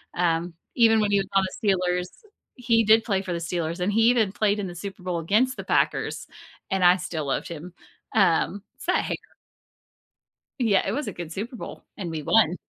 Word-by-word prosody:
um, 170 0 0 0.2
even 225 -2 +5
when 205 -1 +1
he 200 - +4
was 195 - -2
on 195 - +5 0.2
the 210 - +1
Steelers, 180 0 -1 0.5
he 230 -3 +2
did 220 +1 +6
play 195 -3 0
for 185 -2 -4
the 170 - -2
Steelers 170 0 -3
and 195 +3 +1
he 225 +2 +3
even 225 -6 +2
played 210 0 +1
in 195 - -3
the 175 - -8
Super 190 0 -8
Bowl 180 -2 -2
against 220 +10 +1
the - - -5
Packers, - - 0 0.4
and 190 -1 0
I 175 +1 +7
still 165 -4 -4
loved 135 - -2
him, 170 +2 -8 0.4
um, 195 0 +2
it's - - -12
that - - +2
hair. - - -2 1.4
Yeah, 205 -5 +3
it - - -1
was 295 +1 -3
a - - -4
good 170 -2 -7
Super 225 +8 -5
Bowl, - - -9
and 175 -5 -4
we 155 -1 -4
won. 180 0 +3
190 Hz, 205 wpm, -25 LUFS, 175-215 Hz, 1.4 s, I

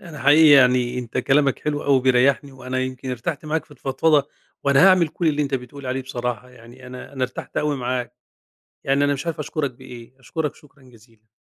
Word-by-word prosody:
أنا 160 -4 -11
حقيقي 145 +4 +6
يعني 125 -1 +2
أنت 120 -2 -5
كلامك 140 -1 +2
حلو 145 -1 -3
أوي 140 -1 +4
وبيريحني، 130 +2 +2
وأنا 130 -1 -5
يمكن 130 0 -4
ارتحت 135 +6 -4
معاك 155 0 -2
في - - -32
الفضفضة، 145 +1 +1 0.4
وأنا 140 +6 +5
هاعمل 185 -4 +5
كُلّ 165 +2 -1
اللي 150 -1 0
أنت 140 -1 -2
بتقول 130 +2 -7
عليه 130 +1 -2
بصراحة، 125 -1 -5
يعني 125 +1 -15
أنا، 125 +2 -10
أنا 130 - -5
ارتحت 125 0 -5
أوي 150 -1 0
معاك، 125 -1 -3 0.7
يعني 140 +1 +1
أنا 145 - +1
مش 140 +4 -5
عارف 165 -2 -4
أشكرك 150 -2 -3
بإيه، 125 0 -13
أشكرك 150 +3 -4
شكرًا 140 -3 -21
جزيلًا. 115 -3 -22
135 Hz, 195 wpm, -22 LUFS, 125-145 Hz, 0.7 s, حقيقي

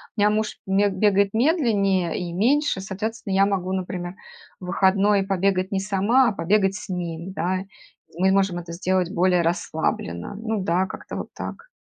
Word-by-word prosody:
У - - -6
меня 205 - +5
муж 215 0 -1
ме 195 +2 +3
бегает 200 0 +2
медленнее 215 - +2
и 175 -2 -4
меньше, 255 - +2
соответственно, 205 +2 -4
я 195 +1 +5
могу, 190 -2 -1
например, 180 -1 -4 0.5
в 180 - -9
выходной 195 +2 +3
побегать 190 -1 0
не 195 - 0
сама, 210 +6 +3
а - - -1
побегать 195 +2 +1
с 210 - -8
ним, 175 0 -4
да. 185 +3 -1 0.5
Мы 190 +1 +4
можем 190 -2 +2
это 170 -1 -9
сделать 185 0 0
более 180 -2 +3
расслабленно. 160 - -2
Ну 220 0 -2
да, 180 +1 +1
как-то - - -8
вот - - -5
так. 470 - -7
190 Hz, 170 wpm, -23 LUFS, 180-205 Hz, 0.5 s, меня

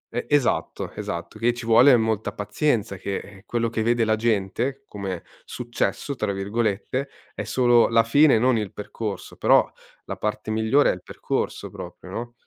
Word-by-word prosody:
E 120 - -2
esatto, 145 -4 0
esatto, 85 +5 -6
che 120 +1 +2
ci 120 -1 -7
vuole 120 +3 +7
molta 110 -2 -1
pazienza, 105 0 -1
che, 100 +1 -3
ehm, 95 -1 -11
quello 115 -1 0
che 110 - -2
vede 115 +1 +2
la 110 0 +2
gente, 115 +5 -1
come 95 -4 -5 0.2
"successo", 125 +3 -3
tra 105 -5 -2
virgolette, 110 +6 -2 0.2
è - - -4
solo 120 +1 +4
la 115 0 +4
fine, 140 +3 +5
non 125 +2 +3
il 105 -3 -4
percorso; 105 0 -6
però - - +5 0.4
la - - -5
parte 105 0 -3
migliore 110 +6 +3
è - - -1
il 90 - -9
percorso - - -3
proprio, - - -10
no? 120 +1 -5
115 Hz, 170 wpm, -24 LUFS, 105-120 Hz, 0.4 s, vuole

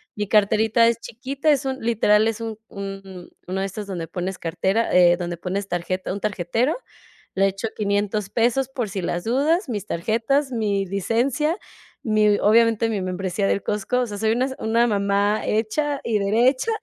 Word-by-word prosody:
Mi 210 -1 -3
carterita 220 +2 +3
es 235 - +2
chiquita, 270 +6 -3
es 285 -2 +3
un 265 0 -2
literal 220 -2 +3
es 225 0 -2
un 225 -2 -4
un 195 -2 -8 0.2
uno 185 +1 -2
de - - 0
estos 200 +1 -6
donde 175 -4 -4
pones 180 +3 -4
cartera, 190 +7 0
eh, 175 -1 +6
donde 175 -1 -4
pones 190 +3 -3
tarjeta 180 +1 -2
un 200 - -3
tarjetero. 215 - 0 0.6
Le 195 +1 +3
echo 195 +4 -4
500 205 0 -1
pesos 240 +4 +1
por 250 -4 -3
si 190 -1 -4
las 175 0 -2
dudas, 295 - +1
mis 210 -5 -4
tarjetas, 230 - 0
mi 205 -4 0
licencia, 240 - 0 0.5
mi 215 -2 +3
obviamente, 230 +1 +4
mi 215 -3 -1
membresía 185 +2 -2
del 200 - 0
Costco. 210 +5 -1
O 250 - 0
sea, 205 -2 -6
soy 220 +1 +1
una 245 +3 +1
s 265 - -5
una 230 +2 +2
mamá 205 0 +1
hecha 275 +7 0
y 220 -2 +1
derecha. 245 - +2
210 Hz, 180 wpm, -23 LUFS, 195-235 Hz, 0.6 s, eh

